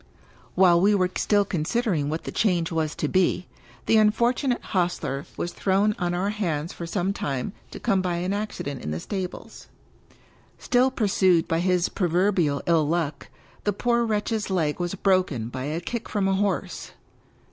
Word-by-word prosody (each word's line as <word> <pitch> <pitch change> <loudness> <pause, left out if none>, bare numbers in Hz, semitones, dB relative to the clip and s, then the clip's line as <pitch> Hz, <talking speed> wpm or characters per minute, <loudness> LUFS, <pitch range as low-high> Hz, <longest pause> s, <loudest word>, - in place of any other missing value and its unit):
While 175 -2 +5
we 205 +2 +4
were 185 -2 +1
still 205 -1 +2
considering 175 - -1
what 160 +2 -3
the - - -5
change 175 -6 +1
was 160 -2 -1
to - - -1
be, 185 -1 +1 0.4
the 225 - +4
unfortunate 240 +4 +2
hostler 175 -7 -2
was 175 - -2
thrown 200 +2 +1
on 175 -1 0
our 195 +3 0
hands 170 -7 -2
for 170 - -6
some 190 +2 -1
time 140 +2 -3 0.2
to - - -9
come 195 -1 +1
by 180 -2 -1
an 180 +3 -1
accident 200 -9 -4
in - - -5
the 80 +1 -3
stables. 185 - -6 0.9
Still 250 +1 +2
pursued 190 -8 +2
by 165 - +1
his 180 0 +2
proverbial 175 -4 +1
ill 165 -3 +3
luck, 165 -2 -2 0.4
the 205 - +1
poor 235 +3 +1
wretch's 215 -1 -1
leg 165 -5 0
was 175 +2 -2
broken 185 - +1
by 130 +1 -5
a 155 +3 -2
kick 235 +6 -5
from 200 -3 0
a 195 - +2
horse. 200 +1 -2
185 Hz, 170 wpm, -25 LUFS, 165-205 Hz, 0.9 s, While